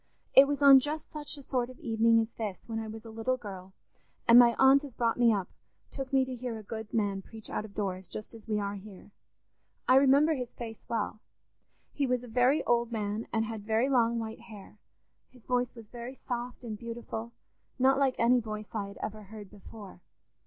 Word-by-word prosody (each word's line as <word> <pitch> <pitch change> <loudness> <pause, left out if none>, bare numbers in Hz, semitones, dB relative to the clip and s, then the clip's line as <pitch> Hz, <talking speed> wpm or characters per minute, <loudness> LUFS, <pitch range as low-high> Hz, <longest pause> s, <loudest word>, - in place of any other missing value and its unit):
It 275 +1 +9
was 285 0 -1
on 275 -1 +10
just 295 +3 -4
such 300 -1 -4
a 280 - -11
sort 250 -2 -1
of 255 - -12
evening 230 0 +3
as 225 0 -1
this, 210 -4 -5
when 225 0 -4
I 220 - -5
was 220 +1 -9
a 225 - -9
little 225 +3 -1
girl, 190 -5 -9 0.6
and 235 +1 +9
my 235 -1 +6
aunt 270 +2 +6
as 275 -4 -10
brought 230 0 0
me 235 -1 +6
up 195 -4 -1 0.4
took 270 -1 -6
me 265 -1 +3
to 260 - -6
hear 245 -2 -5
a 215 - -9
good 220 +1 -7
man 200 -3 0
preach 220 +2 -10
out 210 - -2
of 200 - -14
doors, 190 -3 -3
just 215 - -7
as 225 -1 -13
we 210 -1 0
are 200 0 -2
here. 200 0 -11 0.8
I 255 - +6
remember 280 +4 +5
his 250 -4 -5
face 225 -2 -8
well: 215 -1 -2 0.7
he 280 -2 0
was 250 -1 0
a - - -9
very 250 +5 +2
old 235 0 +1
man, 215 0 -3
and 225 -1 +1
had 220 -1 -5
very 225 +5 +1
long 235 -3 +3
white 225 -1 -5
hair; 215 -3 -13 0.5
his 250 -3 -21
voice 250 0 0
was 230 -2 -12
very 245 +2 -8
soft 245 0 -5
and 215 -3 -6
beautiful, 235 -1 -6 0.5
not 270 +1 +4
like 270 -2 +2
any 245 +2 +4
voice 215 -2 -7
I 205 -3 -2
had 200 - -11
ever 215 0 -5
heard 205 -1 -11
before. 205 -2 -12
230 Hz, 215 wpm, -30 LUFS, 215-255 Hz, 0.8 s, on